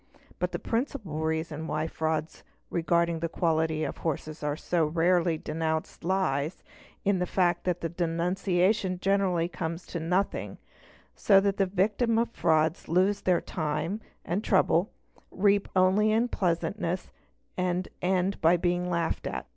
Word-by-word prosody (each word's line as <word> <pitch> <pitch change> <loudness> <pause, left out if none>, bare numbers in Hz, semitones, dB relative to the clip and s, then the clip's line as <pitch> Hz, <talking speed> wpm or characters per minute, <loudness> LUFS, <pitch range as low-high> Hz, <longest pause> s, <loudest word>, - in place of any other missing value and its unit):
But - - -1
the - - -2
principal 230 - -3
reason 160 0 -2
why 155 0 -1
frauds 160 -1 -3 0.3
regarding 170 0 +1
the 165 0 -2
quality 160 -2 0
of - - -3
horses 155 -1 -4
are 145 -1 -1
so 170 +1 0
rarely 170 +1 +2
denounced 160 +1 -3
lies 170 -4 0 0.4
in 195 -2 +2
the 180 - 0
fact 175 -2 +1
that 180 -1 0
the 165 - -2
denunciation 180 +3 0
generally 190 -3 +1
comes 165 0 -5
to 170 - -5
nothing, 180 +5 -1 0.6
so 195 -2 +5
that 200 0 0
the 195 - +2
victims 210 +5 +1
of 230 0 0
the - - -21
frauds 160 0 +2
lose 185 +4 +2
their 180 -2 +2
time 155 +5 -2 0.2
and 190 +5 -1
trouble, 190 -2 +3 0.4
reap 200 +1 +2
only 190 +4 +4
unpleasantness, 185 -5 -1 0.4
and 180 0 -1
end 185 +1 0
by 170 +2 +5
being 175 +1 0
laughed 170 -2 -1
at. - - -4
175 Hz, 145 wpm, -28 LUFS, 160-190 Hz, 0.6 s, so